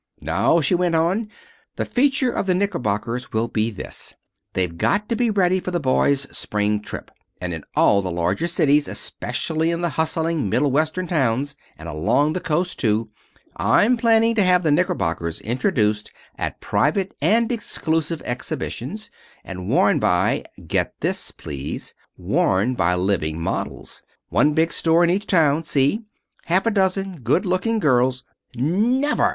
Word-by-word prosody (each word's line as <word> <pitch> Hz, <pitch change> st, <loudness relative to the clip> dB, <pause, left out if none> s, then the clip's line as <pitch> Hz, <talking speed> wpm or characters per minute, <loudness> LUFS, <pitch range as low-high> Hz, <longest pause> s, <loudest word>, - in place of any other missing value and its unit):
"Now," 95 Hz, -, +2 dB
she 145 Hz, -, +2 dB
went 175 Hz, -1 st, +2 dB
on, 185 Hz, +7 st, +1 dB, 0.5 s
"the -, -, -2 dB
feature 270 Hz, -1 st, +2 dB
of 195 Hz, -, -2 dB
the 185 Hz, -, +3 dB
knickerbockers 120 Hz, -, -2 dB
will 110 Hz, +1 st, 0 dB
be 110 Hz, -1 st, 0 dB
this: 105 Hz, -, -8 dB, 0.4 s
They've 90 Hz, -3 st, -1 dB
got 205 Hz, -, +1 dB
to 230 Hz, -, +1 dB
be 235 Hz, +1 st, +1 dB
ready 185 Hz, -3 st, +2 dB
for 185 Hz, -, -5 dB
the 175 Hz, -1 st, -1 dB
boys' 140 Hz, 0 st, +2 dB
spring 105 Hz, 0 st, -1 dB
trip, -, -, -7 dB, 0.3 s
and 90 Hz, -1 st, -4 dB
in 80 Hz, -, -6 dB
all 100 Hz, -, +4 dB
the 95 Hz, -, -4 dB
larger 90 Hz, -, 0 dB
cities, 150 Hz, -4 st, +2 dB
especially 160 Hz, 0 st, -2 dB
in 170 Hz, 0 st, -1 dB
the 175 Hz, -, 0 dB
hustling 160 Hz, -5 st, 0 dB
Middle 140 Hz, +7 st, +2 dB
Western 155 Hz, +6 st, 0 dB
towns, 140 Hz, -4 st, 0 dB, 0.2 s
and -, -, -9 dB
along 145 Hz, -, +1 dB
the 185 Hz, -, -2 dB
coast, 175 Hz, +1 st, -1 dB
too, 110 Hz, -1 st, 0 dB, 0.5 s
I'm 240 Hz, +4 st, +4 dB
planning 230 Hz, -1 st, +3 dB
to 215 Hz, -3 st, +3 dB
have 180 Hz, -1 st, +3 dB
the 155 Hz, -, +2 dB
knickerbockers 85 Hz, -, 0 dB
introduced 110 Hz, -, 0 dB, 0.2 s
at -, -, -4 dB
private 190 Hz, +6 st, 0 dB
and 230 Hz, +3 st, +3 dB
exclusive 165 Hz, -8 st, -2 dB
exhibitions, 120 Hz, +1 st, -5 dB, 0.3 s
and 90 Hz, -1 st, -7 dB
worn -, -, +3 dB
by -, -, +1 dB, 0.2 s
get -, -, -1 dB
this, -, -, -2 dB
please 70 Hz, -1 st, -7 dB, 0.2 s
worn 100 Hz, +7 st, +1 dB
by 90 Hz, -6 st, +1 dB
living 90 Hz, -4 st, -1 dB
models. 85 Hz, -, -4 dB, 0.3 s
One 120 Hz, -, +3 dB
big 165 Hz, +1 st, +2 dB
store 165 Hz, +1 st, +3 dB
in 170 Hz, -, +3 dB
each 200 Hz, +3 st, -1 dB
town, 160 Hz, -3 st, +3 dB
see? 145 Hz, -, +1 dB, 0.4 s
Half 185 Hz, +5 st, +1 dB
a 230 Hz, -, +3 dB
dozen 195 Hz, -3 st, 0 dB
good 140 Hz, -, +1 dB
looking 185 Hz, +5 st, 0 dB
girls 130 Hz, -, +2 dB, 0.2 s
" -, -, -29 dB
"Never!" 225 Hz, -, +2 dB
155 Hz, 155 wpm, -22 LUFS, 110-185 Hz, 0.5 s, all